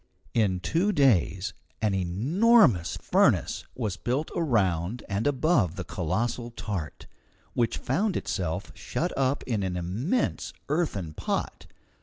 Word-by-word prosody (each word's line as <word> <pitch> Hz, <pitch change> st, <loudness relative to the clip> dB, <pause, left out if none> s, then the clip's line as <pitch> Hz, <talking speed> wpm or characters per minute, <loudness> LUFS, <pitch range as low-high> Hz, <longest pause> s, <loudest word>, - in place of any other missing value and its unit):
In 100 Hz, -6 st, +1 dB
two 170 Hz, -, +1 dB
days 105 Hz, -, +2 dB, 0.3 s
an 110 Hz, -2 st, +1 dB
enormous 120 Hz, -, +3 dB
furnace -, -, +2 dB
was 105 Hz, -7 st, -2 dB
built 130 Hz, -, -2 dB
around 105 Hz, -, +1 dB
and 100 Hz, +5 st, -1 dB
above 140 Hz, -, +2 dB
the 95 Hz, -, -4 dB
colossal 110 Hz, +9 st, -2 dB
tart, 100 Hz, -8 st, -5 dB, 0.5 s
which 115 Hz, -2 st, +1 dB
found 190 Hz, -, 0 dB
itself 80 Hz, -5 st, -3 dB
shut -, -, -3 dB
up 135 Hz, +1 st, +1 dB
in 115 Hz, -5 st, -1 dB
an 95 Hz, -2 st, -2 dB
immense 115 Hz, -, -1 dB, 0.2 s
earthen 120 Hz, -, -1 dB
pot. -, -, -3 dB
110 Hz, 120 wpm, -27 LUFS, 90-140 Hz, 0.5 s, enormous